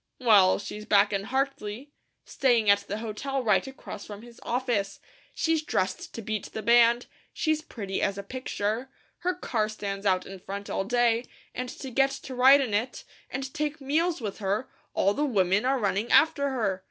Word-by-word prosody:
Well, 205 -7 +5
she's 210 +1 -7
back 205 0 +4
in 195 0 -1
Hartley, 265 0 -3 0.3
staying 235 -6 +3
at 200 - +5
the 205 - -3
hotel 235 +5 -3
right 235 +4 +2
across 265 -6 -8
from 205 +1 -9
his 235 -1 -14
office; 235 -5 -1 0.4
she's 325 -1 +1
dressed 190 -10 -2
to 230 - -6
beat 215 0 -3
the 220 - -5
band, 235 0 +5 0.3
she's 310 -1 0
pretty 200 -10 -5
as 200 -1 0
a 200 - -5
picture; 235 +1 -3 0.3
her 360 0 -1
car 220 -11 -1
stands 200 -2 -4
out 185 -1 +2
in 195 0 -9
front 200 +2 -6
all 195 - -1
day, 240 +1 +2 0.3
and 250 0 -4
to 265 +1 -8
get 270 +3 +3
to 270 - -7
ride 265 +3 +7
in 245 -6 -2
it, 225 +5 -1 0.3
and 270 +1 -5
take 300 0 -2
meals 315 +3 0
with 210 -2 -5
her, 205 +4 -1 0.3
all 200 +1 +3
the 290 - -1
women 200 -5 +2
are 270 +1 +2
running 210 0 -1
after 280 -3 +4
her. 215 -8 -1
230 Hz, 185 wpm, -27 LUFS, 200-265 Hz, 0.4 s, ride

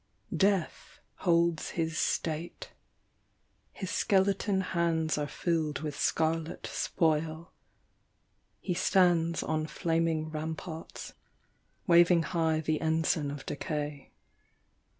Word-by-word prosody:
Death 195 -4 0 0.2
holds 170 -2 +2
his 165 -1 -1
state: 160 +1 -2 1.1
Ihs 190 - -3
skeleton 195 0 +2
hands 170 -3 0
;irr 145 -1 -2
filled 160 -4 -1
with 150 -2 -4
starlet 160 +1 -1
spoil: 160 +1 -1 1.1
He 180 - -2
stands 170 -3 +3
on 155 0 -1
flaming 165 -1 0
ramparts, 160 +1 -6 0.7
waving 170 -2 +5
high 160 -1 0
The 155 0 -1
ensign 160 -2 +1
of 145 -1 -7
decay. 145 -1 -4
165 Hz, 90 wpm, -30 LUFS, 155-170 Hz, 1.1 s, waving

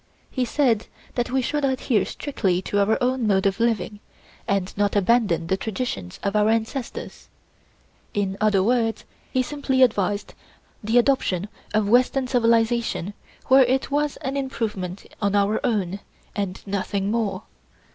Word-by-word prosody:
He 255 -2 0
said 240 -4 +1 0.3
that 240 -1 -1
we 260 0 +1
should 295 +3 -1
adhere 260 -5 +1
strictly 195 -11 -1
to 205 - 0
our 205 +2 +3
own 250 -2 +1
mode 190 -2 +2
of 195 +2 +1
living 225 -2 0 0.5
and 195 -2 -1
not 205 0 +1
abandon 205 -4 +2
the 190 +3 0
traditions 195 - -4
of 200 +1 -1
our 210 0 +4
ancestors. 225 +3 -3 0.9
In 195 -2 0
other 205 -3 +3
words, 225 -1 +1 0.3
he 255 - +2
simply 265 -1 +1
advised 205 -3 +1 0.5
the 220 +3 +2
adoption 220 -7 +2 0.2
of 215 -1 +1
western 255 +4 +3
civilization 230 -5 +1 0.3
where 265 +1 +7
it 260 +3 0
was 295 0 0
an 270 0 -2
improvement 215 -9 -3 0.2
on 205 -1 +1
our 205 +1 +2
own, 200 -4 0 0.4
and 195 -2 -3
nothing 200 0 -2
more. 225 -3 -1
220 Hz, 145 wpm, -23 LUFS, 200-250 Hz, 0.9 s, where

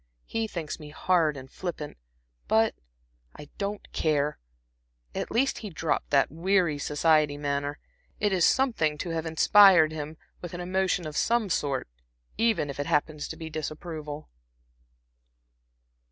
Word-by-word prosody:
He 225 0 -2
thinks 170 -7 -5
me 150 -1 -9
hard 160 -1 +1
and 130 -1 -9
flippant, 155 0 -6 0.5
but 220 0 +3 0.6
I 150 - -11
don't 205 +1 -3
care. 150 -1 0 0.7
At - - -3
least 265 +4 +1
he 215 - -6
dropped 160 -3 -2
that 140 -3 +3
weary, 170 -2 +1
society 150 0 +2
manner. 145 0 -2 0.4
It 205 -1 +1
is 180 -2 +2
something 225 - +2
to 170 +3 -4
have 165 0 -2
inspired 170 0 +6
him 155 0 -6 0.2
with 175 0 -6
an - - -6
emotion 185 -1 0
of 155 -1 -6
some 230 0 +1
sort, 140 - -1 0.5
even 225 -9 +2
if 140 0 -7
it 145 - -2
happens 150 0 0
to - - -7
be 160 -1 -7
disapproval." 155 -1 -6
160 Hz, 140 wpm, -27 LUFS, 150-190 Hz, 0.7 s, inspired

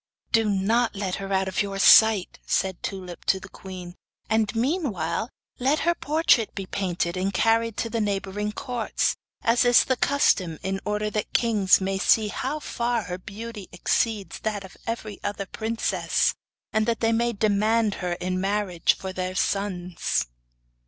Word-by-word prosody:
'Do 225 -2 +3
not 220 +4 +1
let 195 -2 -2
her 195 0 -6
out 190 0 +1
of 190 - 0
your 200 -1 -3
sight,' 215 -1 +6
said 190 -2 0
Tulip 185 -3 -6
to 190 - +2
the 190 - -10
queen, 185 -2 -9 0.4
'and 220 -1 +1
meanwhile, 225 - -1 0.3
let 275 +4 +2
her 345 - +3
portrait 305 -8 +2
be 195 - -4
painted 180 -2 -2
and 190 +2 -1
carried 225 +3 +2
to - - -1
the 230 0 -2
neighbouring 205 0 -2
Courts, 245 -1 -1 0.3
as 230 +1 +4
is 245 -1 +6
the 260 - 0
custom 200 - +2
in 195 0 -2
order 210 0 -1
that 210 -1 -3
the - - +4
kings 210 -5 +4
may 190 0 -1
see 215 +1 +3
how 270 +8 -3
far 240 -5 -1
her 180 0 -5
beauty 210 +1 -8
exceeds 205 +3 -1
that 210 -2 -3
of 190 - -12
every 220 -3 -4
other 205 -1 -3
princess, 225 +4 0 0.4
and 220 0 +2
that 230 -1 0
they 225 0 +3
may 235 +1 +1
demand 215 0 +2
her 180 -1 -1
in 185 +1 -2
marriage 195 -3 +1
for 190 -1 -6
their 185 0 -3
sons. 185 -4 -1
205 Hz, 165 wpm, -25 LUFS, 190-230 Hz, 0.4 s, sight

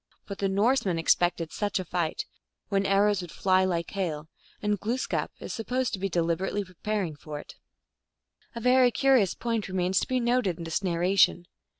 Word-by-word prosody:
But 200 - -7
the 195 - +1
Norsemen 200 -2 +2
expected 165 0 +1
such 205 -1 -1
a 185 - -3
fight, 170 -2 -2 0.4
when 195 -1 +1
arrows 200 0 +3
would 175 - -8
fly 185 -1 +2
like 170 -2 -2
hail, 160 -6 -3 0.3
and 210 -1 0
Glooskap 240 +5 -2
is - - -6
supposed 250 +2 -2
to 195 - -2
be 195 +1 -1
deliberaijly 175 +4 -1
preparing 185 -2 -3
for 150 0 -8
it. - - -11 1.0
A - - -3
very 250 +1 +5
curious 255 -6 +3
point 230 -3 -2
remains 185 0 +1
to - - -2
be 255 -1 +1
noted 235 -7 +1
in 170 - -7
this 165 +2 -2
narration. 180 0 +3
195 Hz, 175 wpm, -27 LUFS, 175-215 Hz, 1.0 s, very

